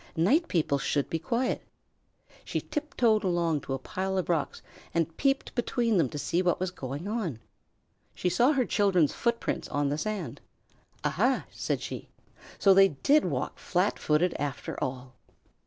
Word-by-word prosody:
"Night 265 - +3
people 155 -4 +1
should 140 +1 -1
be 165 - 0
quiet." 240 +9 -1 0.8
She - - -2
tiptoed 255 -8 +1
along 170 -5 +1
to 135 - -3
a - - -2
pile 190 +8 -3
of 185 - -1
rocks 165 -3 -1 0.3
and 165 -1 0
peeped 275 -1 0
between 235 -2 +1
them 155 -7 +3
to 150 - -6
see 170 +4 0
what 180 -2 +1
was 185 -1 -1
going 145 +1 -6
on. 205 - -2 0.8
She - - -1
saw 245 - +4
her 260 -3 +2
children's 190 -9 +3
footprints 235 -1 -1
on 145 0 0
the 145 +2 -1
sand. 215 +1 -4 0.6
"Aha!" - - +1
said - - -2
she. - - -6 0.5
"So 195 - +6
they 195 0 +7
did 275 - +3
walk - - -2
flat 185 +3 0
footed 160 +4 +2
after 140 -1 -3
all." 130 0 -5
180 Hz, 160 wpm, -28 LUFS, 150-225 Hz, 0.8 s, they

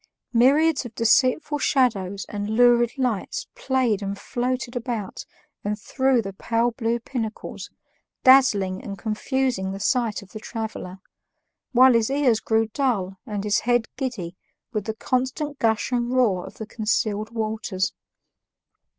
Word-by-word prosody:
Myriads 280 +6 +4
of 240 -3 -10
deceitful 255 +6 +2
shadows 200 -9 +1
and 205 0 -4
lurid 240 +1 +4
lights 245 -7 -1
played 260 - 0
and 200 0 -3
floated 245 +3 -3
about 235 -5 -4 0.4
and 210 +1 -2
through 260 +1 +1
the 195 -1 -6
pale 230 +4 0
blue 230 0 -1
pinnacles, 230 -2 -5 0.5
dazzling 215 -9 +5
and 200 - -6
confusing 220 0 -1
the 195 - -6
sight 225 0 0
of 200 - -18
the 215 - -7
traveler, 220 -5 -6 0.7
while 255 0 +7
his 230 0 +2
ears 270 -5 +2
grew 225 0 +1
dull 210 -8 -1
and 205 -2 -3
his 210 0 +2
head 240 -1 +1
giddy 225 -10 -4 0.4
with 210 -2 -2
the 220 -1 -3
constant 260 +5 -2
gush 220 +1 +1
and 240 -1 0
roar 225 -8 +2
of - - -12
the 220 - -6
concealed 215 -1 -1
waters. 215 -4 -2
230 Hz, 140 wpm, -24 LUFS, 210-255 Hz, 0.7 s, while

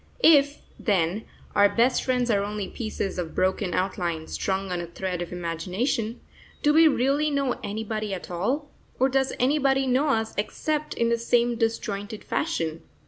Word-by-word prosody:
If, 290 -2 +5 0.2
then, 195 -1 0 0.3
our 205 0 +6
best 235 +5 +2
friends 250 -2 +1
are 200 -2 +2
only 205 -1 -3
pieces 210 -4 -4
of 165 -2 -4
broken 185 -1 0
outline 175 -4 -1
strung 190 +2 -2
on 175 -1 -1
a 170 - -6
thread 180 +1 -4
of 175 - -5
imagination, 185 - -2 0.4
do 295 - +4
we 320 +1 +7
really 280 +2 +2
know 275 -3 0
anybody 215 0 -3
at 185 -1 -5
all, 260 - -1 0.3
or 260 +1 +4
does 265 0 +1
anybody 270 0 +2
know 260 +4 +2
us 225 -5 0
except 305 +8 -2
in 230 0 +1
the 235 0 +1
same 240 +1 +2
disjointed 215 -2 -2
fashion? 165 - -2
220 Hz, 160 wpm, -26 LUFS, 190-265 Hz, 0.4 s, we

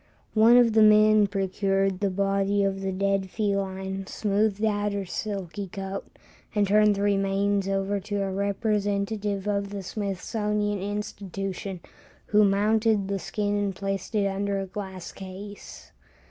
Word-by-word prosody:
One 230 +2 +6
of 235 -2 +5
the 220 - +5
men 215 0 +6
procured 195 -1 0
the 200 - +1
body 195 +1 +1
of 195 0 -1
the 195 0 -2
dead 195 0 0
feline, 195 -2 -2
smoothed 210 0 0
out 205 -1 0
her 200 -1 -2
silky 195 0 -4
coat, 195 0 -7 0.4
and 205 -1 +3
turned 210 +1 +4
the 200 - -2
remains 200 0 +1
over 195 +1 0
to 200 +1 -2
a 195 - -2
representative 200 0 -1
of 200 -1 0
the 200 -1 -6
Smithsonian 205 +1 -2
Institution, 195 -2 -5 0.4
who 210 0 +4
mounted 210 0 +2
the 200 -1 -1
skin 205 +1 -2
and 200 -2 -1
placed 195 +3 -4
it 205 -2 +2
under 200 0 -1
a 195 - -3
glass 190 -2 -7
case. 195 +2 -10
200 Hz, 145 wpm, -26 LUFS, 195-210 Hz, 0.4 s, One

